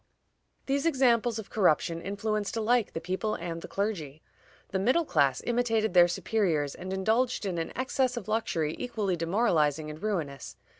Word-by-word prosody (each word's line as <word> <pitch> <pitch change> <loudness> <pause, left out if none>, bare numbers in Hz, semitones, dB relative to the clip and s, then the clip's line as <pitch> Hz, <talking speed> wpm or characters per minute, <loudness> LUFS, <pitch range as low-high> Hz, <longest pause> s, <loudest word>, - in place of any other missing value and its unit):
These 280 +4 0
examples 240 -6 +3
of 220 - -8
corruption 170 -4 +2
influenced 205 +3 -2
alike 230 0 +1
the - - -3
people 190 +5 -2
and 170 -1 -5
the - - -8
clergy. 165 -8 -3 0.5
The 190 - -1
middle 255 - +2
class 140 - +2
imitated 225 -4 +1
their 175 -1 +7
superiors, 170 -6 0
and 185 +1 -7
indulged 220 +5 +1
in 180 -3 -2
an 165 - -3
excess 255 -1 0
of 215 - -5
luxury 170 -8 -1
equally 210 -6 -1
demoralizing 165 -5 +1
and 155 +2 -10
ruinous. 155 -11 -3
200 Hz, 155 wpm, -28 LUFS, 165-230 Hz, 0.5 s, their